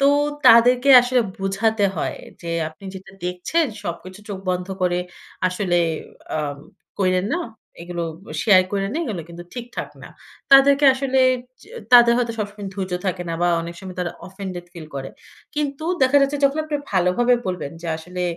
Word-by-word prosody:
তো 275 - +4 0.4
তাদেরকে 245 +3 +6
আসলে 250 0 +2 0.2
বুঝাতে 200 +2 0
হয় - - -3 0.2
যে 170 - -6 0.2
আপনি 195 +5 -17
যেটা 190 +1 -11
দেখছেন, 180 - 0 0.2
সবকিছু 185 +3 -7
চোখ 195 -2 -5
বন্ধ 180 0 -2 0.2
করে 180 0 +1 0.5
আসলে 180 -1 -1 0.6
আম 145 -2 -3 0.4
কইরেন 185 0 +1
না। 350 - -1 0.4
এইগুলো 175 -1 -4 0.4
শেয়ার 190 -4 +6
কইরেন 195 0 -1
না, 320 - -1
এইগুলো 200 - -4
কিন্তু 175 +1 -9
ঠিকঠাক 245 0 -6
না। - - -10 0.4
তাদেরকে 280 +1 +7
আসলে 265 0 0 0.4
যে, - - -17 0.2
তাদের 240 -1 +8
হয়তো 235 -2 0
সবসময় 205 -1 -5
ধৈর্য 190 -2 -4
থাকে 180 -1 -1
না - - -2
বা 175 - +3
অনেক 170 +1 -7
সময় 185 -1 -9
তারা 175 -1 -2
offended 190 -2 -7
feel 165 -3 -9
করে। 135 0 -5 0.4
কিন্তু 295 +1 -3 0.2
দেখা 260 +2 +4
যাচ্ছে 280 +1 0
যখন 280 +2 +2
আপনি 305 -1 -2 0.2
ভালোভাবে 190 +7 +3
বলবেন, 180 -6 -4
যে - - -6
আসলে 180 +3 -6
195 Hz, 165 wpm, -21 LUFS, 180-245 Hz, 0.6 s, তাদের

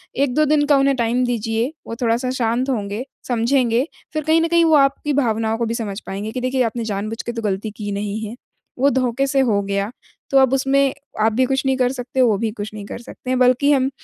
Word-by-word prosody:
1-2 280 +2 +2
दिन 295 0 +3
का 290 -1 +5
उन्हें 275 0 +3
टाइम 240 +1 +1
दीजिए, 230 +1 -1 0.2
वो 230 - -5
थोड़ा-सा 240 +2 +1
शांत 250 +1 0
होंगे, 210 0 -3 0.2
समझेंगे 245 +1 +1 0.3
फिर 310 0 -2
कहीं 320 +2 +3
न 330 - +2
कहीं 335 0 +4
वो 320 -1 +5
आपकी 280 +1 +2
भावनाओं 225 -5 +1
को 235 - +1
भी 230 - -2
समझ 210 -4 -4
पाएँगे 200 +3 -4
कि 255 - -4
देखिए 255 0 +1
आपने 230 0 -2
जानबूझ 215 +2 -3
के - - -4
तो 230 - -4
गलती 210 0 -2
की 205 -1 -4
नहीं 205 +1 -3
है। 230 - -8 0.4
वो 275 +2 +4
धोखे 260 0 0
से 275 0 +1
हो 225 -6 +2
गया 200 +1 -2 0.4
तो 275 - +4
अब 265 -1 +4
उसमें 270 0 +2 0.3
आप 220 0 +3
भी 255 +4 +3
कुछ 270 +1 -1
नहीं 265 0 +2
कर 250 -1 +2
सकते, 255 0 -2
वो 225 -5 +4
भी 220 +1 -1
कुछ 210 -1 -7
नहीं 210 -2 -7
कर - - -7
सकते 255 +1 -5
बल्कि 255 +3 +4
हम 265 -2 +3
245 Hz, 230 wpm, -20 LUFS, 220-270 Hz, 0.4 s, का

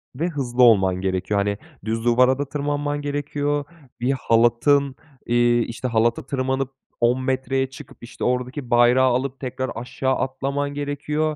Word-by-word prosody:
ve 160 +6 -1
hızlı 130 -5 0
olman 95 -6 +5
gerekiyor. 95 +2 -1
Hani, 100 0 0 0.3
düz 115 +1 -2
duvara 125 +2 +4
da 145 - 0
tırmanman 145 0 -2
gerekiyor, 145 0 -2 0.4
bir 125 +3 +1
halatın 130 +3 +2 0.3
eee, 120 0 +3
işte, 120 +2 -4
halata 115 0 +1
tırmanıp 130 0 -1 0.3
10 120 +2 +3
metreye 130 0 0
çıkıp, 135 +1 -12
işte, 120 - -8
oradaki 125 +1 -2
bayrağı 120 +2 +5
alıp 130 +2 -1
tekrar 130 0 -4
aşağı 130 +3 -2
atlaman 140 +2 -2
gerekiyor, 150 +2 -2
130 Hz, 145 wpm, -22 LUFS, 120-145 Hz, 0.4 s, olman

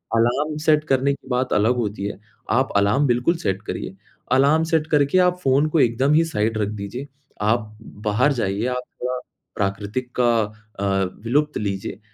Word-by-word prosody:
Alarm 135 +7 +1
set 150 -1 +4
करने 135 +1 +2
की 140 - -12
बात 125 +1 0
अलग 110 +4 +3
होती 105 -4 -2
है। 100 - -5 0.3
आप 130 +3 +2
अलार्म 105 +8 +3
बिल्कुल 125 +8 +2
सेट 95 - -2
करिए। 95 - -5 0.4
अलार्म 140 +5 +4
सेट 160 -1 +2
करके 145 +4 +3
आप 180 0 +3
फ़ोन 135 +3 +3
को 160 - +1
एकदम 130 +4 +3
ही 160 +2 +5
साइड 110 -6 -1
रख 105 -2 0
दीजिए। 110 +7 -6 0.3
आप 110 0 0 0.3
बाहर 110 +8 +3
जाइए, 100 -2 -1
आप 125 0 -2 0.2
थोड़ा 125 0 -2 0.4
प्राकृतिक 105 +5 -3
का 120 -1 +4 0.5
अ, - - -2 0.4
विलुप्त 150 +5 +1
लीजिए। 100 -1 -4
125 Hz, 170 wpm, -22 LUFS, 105-145 Hz, 0.5 s, ही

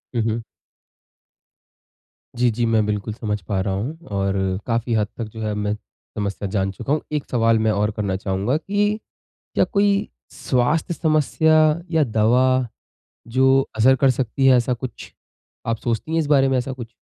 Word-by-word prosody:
हुँ, 115 - +2
हुँ। 115 0 -1 1.9
जी, 120 0 +3
जी 115 +2 -1
मैं 110 -2 +2
बिल्कुल 105 +1 -2
समझ 105 -3 -3
पा 95 +2 -2
रहा 95 -1 -1
हूँ 125 +12 -3 0.2
और 95 0 0 0.3
काफ़ी 115 0 0
हद 105 -1 +1
तक 115 - -3
जो 110 - -7
है 105 -1 -2
मैं 105 0 -1 0.4
समस्या 100 -1 -3
जान 95 -1 0
चुका 135 +8 -3
हूँ। 155 - 0
1 150 -2 -2
सवाल 115 -2 +3
मैं 110 0 +2
और 105 +1 +1
करना 100 -3 -2
चाहूँगा 100 +6 -1
कि 205 +5 0 0.6
क्या - - +4
कोई 205 -1 +2 0.4
स्वास्थ्य 140 +7 0
समस्या 155 0 +2 0.4
या 160 -2 +3
दवा 115 +2 +3 0.9
जो 135 0 +5 0.2
असर 130 +4 +5
कर 135 0 +3
सकती 130 +1 0
है 130 -1 +7
ऐसा 125 +1 +1
कुछ, 120 +1 -8 0.5
आप 115 0 -1
सोचती 120 +7 -3
हैं 165 - +2
इस 155 - 0
बारे 135 -2 +4
में 130 - +2
ऐसा 125 +2 -2
कुछ? 120 -3 -9
115 Hz, 170 wpm, -22 LUFS, 105-135 Hz, 1.9 s, है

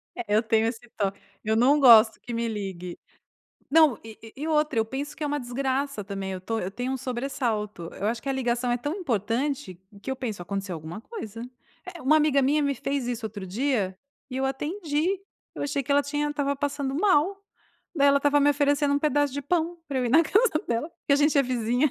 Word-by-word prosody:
É, 240 - -4
eu 215 - +5
tenho 225 0 +2
esse 230 0 -3 0.2
to 200 -2 +1 0.3
eu 220 +1 +1
não 270 +6 +4
gosto 230 -4 +7
que 240 - -7
me 230 0 -1
ligue. 190 -5 -5 0.7
Não, 310 -6 +5
e 220 -1 -11
e 225 -1 -11
e 315 - -2
outra 300 -5 +1
eu 220 - +3
penso 275 +6 -5
que 310 - -4
é - - 0
uma 290 0 -1
desgraça 265 -1 -2
também 195 -1 -4
eu 185 - -5
tô 225 +4 -3
eu 185 -2 -3
tenho 245 +5 -3
um - - -1
sobressalto, 240 - -3
eu 200 - -3
acho 225 +1 -1
que - - -5
a - - +1
ligação 245 -2 0
é 240 - +2
tão 290 +6 -3
importante 250 - -2 0.2
que 265 - -4
eu 265 - -2
penso 225 -8 -4
acontecer 195 +1 -4
alguma 160 +4 -7
coisa. 230 - -8 0.4
Eh, 360 -2 -8
uma 290 +4 +5
amiga 295 -3 +3
minha 295 +3 +2
me 280 -1 +1
fez 275 0 -2
isso 240 -1 -3
outro 205 -2 -7
dia, 205 -2 -1 0.3
e 255 - -4
eu 265 - 0
atendi, 310 +5 -1 0.4
eu - - -5
achei 285 0 -1
que 275 - -9
ela 285 0 +4
tinha 290 +1 -1
estava 285 -1 -1
passando 280 -1 -2
mal, 375 +3 +2 0.5
daí 285 -3 +4
ela 280 0 +5
estava 290 +1 +3
me 290 +1 +5
oferecendo 285 0 +2
um - - +3
pedaço 290 -1 +1
de 285 - -3
pão 340 +3 -1
pra 275 -2 -1
eu 255 - 0
ir - - 0
na 320 +6 +6
casa 405 -1 +2
dela, 235 +8 -1
porque 290 - -3
a - - +6
gente 295 +1 +3
é - - +6
vizinha. 245 +2 +1
265 Hz, 225 wpm, -26 LUFS, 225-290 Hz, 0.7 s, gosto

